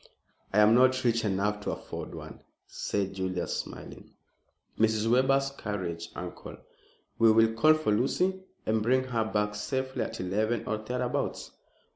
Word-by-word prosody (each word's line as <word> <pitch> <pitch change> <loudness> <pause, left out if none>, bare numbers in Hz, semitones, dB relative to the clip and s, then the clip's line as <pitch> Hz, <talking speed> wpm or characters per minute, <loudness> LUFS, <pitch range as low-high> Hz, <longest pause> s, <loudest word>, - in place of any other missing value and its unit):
"I 100 - -1
am 105 +1 +6
not 130 +1 +4
rich 115 -2 +2
enough 105 +1 0
to - - -2
afford - - -7
one," - - -10 0.2
said 100 -1 -3
Julius, 95 -2 -2
smiling. - - -7 0.7
"Mrs. 110 0 +2
Webber's 135 +3 +3
carriage, 95 -9 -5
uncle. - - -7 0.6
We 115 -1 +7
will 115 0 +4
call 155 +8 +5
for 155 -8 0
Lucy 180 - +1 0.2
and 110 0 +1
bring 130 +4 +2
her 120 -3 -1
back 105 -1 -1
safely 130 +5 -3
at - - -4
eleven 105 +5 -1
or 110 - -1
thereabouts." 125 +3 -3
110 Hz, 145 wpm, -29 LUFS, 105-130 Hz, 0.7 s, We